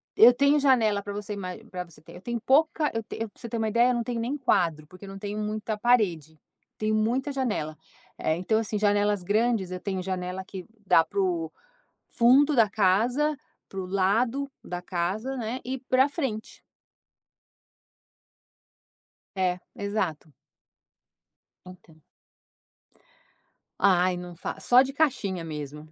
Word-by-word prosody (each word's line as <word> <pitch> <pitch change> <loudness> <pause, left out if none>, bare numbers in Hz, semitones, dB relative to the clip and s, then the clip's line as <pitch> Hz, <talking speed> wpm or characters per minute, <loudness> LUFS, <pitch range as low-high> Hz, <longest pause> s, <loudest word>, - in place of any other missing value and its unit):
Eu 235 +2 +9
tenho 280 +4 +3
janela 230 -7 +3
pra 205 - -7
você 205 0 -5
ima 185 -3 -5
pra 180 -1 -4
você 170 -3 -16
ter 165 +2 -14
eu - - -11
tenho 240 +3 -3
pouca 295 +5 +2
eu 225 - -1
ten - - -8
eu 225 - -2
pra - - -20
você 235 - -6
ter 230 - -3
uma 220 -1 0
ideia 235 +3 +4
eu - - +2
não 235 - -1
tenho 240 -1 -3
nem 255 +6 -2
quadro, 165 - +1
porque 185 +4 -13
eu - - -9
não 195 - -8
tenho 205 +1 -4
muita 215 0 -3
parede. 180 - +1 0.4
Tenho 215 0 0
muita 240 +6 0
janela, 210 - -2 0.4
é 155 - 0
então 185 +6 +1
assim 220 -1 -2
janelas 205 -1 +2
grandes 210 -1 +1
eu 180 - -4
tenho 190 0 -3
janela 185 0 -4
que 185 -1 -9 0.2
dá 165 - +5
para 405 - -4
o 355 -4 0 0.6
fundo 270 +5 +4
da 225 -4 +5
casa, 235 +10 +2 0.3
para 195 - -6
o 185 - -4
lado 225 +9 +1
da 175 0 -5
casa, 190 +9 -2
né, 235 +1 -3
e 260 +2 -3
pra 260 +1 +2
frente. 265 -8 -4 2.7
É, 180 -1 0 0.2
exato. 190 -7 -3 1.3
Então. 170 -4 -15 1.8
Ai 185 -2 +4
não 175 -1 -8
fa 170 - -6
só 245 +1 +6
de 270 +1 -2
caixinha 215 - 0
mesmo, 150 -1 -7
210 Hz, 155 wpm, -26 LUFS, 185-245 Hz, 2.7 s, Eu